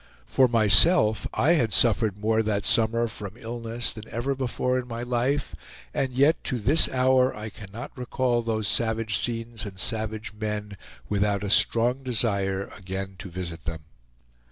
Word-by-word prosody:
For 130 Hz, -, +3 dB
myself 110 Hz, -, +4 dB
I 155 Hz, -, +2 dB
had 125 Hz, -10 st, +2 dB
suffered 110 Hz, -3 st, +3 dB
more 110 Hz, +2 st, +1 dB
that 105 Hz, -2 st, -1 dB
summer 115 Hz, +1 st, +2 dB
from 105 Hz, -3 st, -7 dB
illness 115 Hz, 0 st, -3 dB
than 110 Hz, 0 st, -10 dB
ever 120 Hz, +4 st, -2 dB
before 130 Hz, -1 st, -1 dB
in 125 Hz, -, -7 dB
my 115 Hz, 0 st, -5 dB
life, 125 Hz, +4 st, -1 dB, 0.4 s
and 135 Hz, -1 st, -1 dB
yet 140 Hz, +6 st, +2 dB
to 125 Hz, -, -1 dB
this 135 Hz, +9 st, +4 dB
hour 130 Hz, 0 st, +2 dB
I 105 Hz, +1 st, -6 dB
cannot 105 Hz, +5 st, -10 dB
recall 125 Hz, -1 st, 0 dB
those 110 Hz, -2 st, -2 dB
savage 110 Hz, -2 st, 0 dB
scenes 115 Hz, -1 st, -3 dB
and 100 Hz, -3 st, -8 dB
savage 110 Hz, 0 st, -3 dB
men 105 Hz, -1 st, -4 dB, 0.3 s
without 100 Hz, -1 st, 0 dB
a 100 Hz, -, -2 dB
strong 120 Hz, +4 st, +3 dB
desire 100 Hz, -6 st, -1 dB
again 95 Hz, 0 st, -6 dB
to 95 Hz, -, -7 dB
visit 85 Hz, -2 st, -7 dB
them. 85 Hz, -3 st, -4 dB
115 Hz, 155 wpm, -25 LUFS, 105-125 Hz, 0.4 s, myself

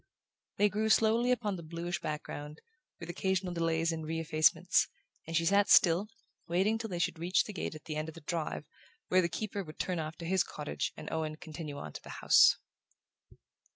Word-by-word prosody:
They 205 Hz, -, +5 dB
grew 215 Hz, +2 st, -1 dB
slowly 225 Hz, +3 st, +4 dB
upon 215 Hz, -6 st, 0 dB
the -, -, -7 dB
bluish 170 Hz, +2 st, -4 dB
background, 150 Hz, 0 st, -5 dB, 0.4 s
with 170 Hz, -, -7 dB
occasional 185 Hz, +1 st, -1 dB
delays 165 Hz, 0 st, +1 dB
and 160 Hz, -1 st, -4 dB
re 160 Hz, +1 st, -3 dB
effacements, 155 Hz, -1 st, +3 dB, 0.4 s
and 165 Hz, 0 st, 0 dB
she 165 Hz, -, +1 dB
sat 200 Hz, +3 st, +4 dB
still, 175 Hz, +4 st, +6 dB, 0.4 s
waiting 195 Hz, +6 st, +1 dB
till 225 Hz, -1 st, -4 dB
they 180 Hz, -, -3 dB
should 170 Hz, -1 st, -1 dB
reach 175 Hz, +3 st, +2 dB
the 210 Hz, -, -8 dB
gate 185 Hz, -, -4 dB
at 155 Hz, -, -10 dB
the 155 Hz, -1 st, -4 dB
end 155 Hz, +1 st, -3 dB
of 160 Hz, -, -11 dB
the 165 Hz, -, -11 dB
drive, 160 Hz, 0 st, -3 dB, 0.4 s
where 185 Hz, 0 st, +5 dB
the 170 Hz, -, 0 dB
keeper 205 Hz, +2 st, -3 dB
would 155 Hz, -3 st, -11 dB
turn 180 Hz, -2 st, -1 dB
off 155 Hz, 0 st, -4 dB
to 170 Hz, -, -8 dB
his 185 Hz, +1 st, +2 dB
cottage 150 Hz, -1 st, -4 dB
and 155 Hz, -, -8 dB
Owen 155 Hz, -1 st, -2 dB
continue 155 Hz, -2 st, -7 dB
on 75 Hz, -, -7 dB
to -, -, -7 dB
the -, -, -9 dB
house. -, -, +6 dB
170 Hz, 200 wpm, -32 LUFS, 155-190 Hz, 0.4 s, still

